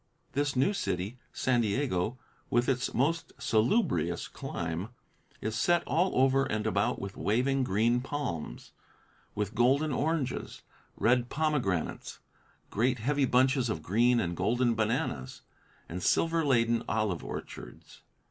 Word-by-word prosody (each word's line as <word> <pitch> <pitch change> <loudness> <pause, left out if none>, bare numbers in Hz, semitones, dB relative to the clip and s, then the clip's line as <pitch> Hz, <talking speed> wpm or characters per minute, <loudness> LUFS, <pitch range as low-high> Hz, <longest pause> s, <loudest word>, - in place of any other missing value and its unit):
This 145 0 0
new 135 +11 +3
city, 105 - -3
San 125 -2 +1
Diego, 110 -1 0 0.3
with 120 +1 +2
its 125 -2 0
most 155 +7 0
salubrious 110 - +1
clime, 85 +5 -4 0.5
is 110 +1 -2
set 175 +10 +2
all 170 +1 +1
over 135 +1 +4
and 110 -4 -2
about 100 -2 +1
with 100 0 -6
waving 130 +5 +1
green 115 +3 +2
palms, 130 - -5 0.6
with 105 0 -2
golden 135 +6 +3
oranges, 145 -1 -2 0.3
red 120 +1 +2
pomegranates, 145 - -1 0.5
great 125 +4 +1
heavy 140 +5 +1
bunches 130 0 +3
of 80 -8 -3
green 120 +7 +3
and 85 -4 -1
golden 120 +6 +1
bananas, 110 - -2 0.4
and 90 +2 -5
silver 165 - +2
laden 115 -4 +2
olive 110 -6 0
orchards. - - -9
120 Hz, 125 wpm, -30 LUFS, 105-135 Hz, 0.6 s, over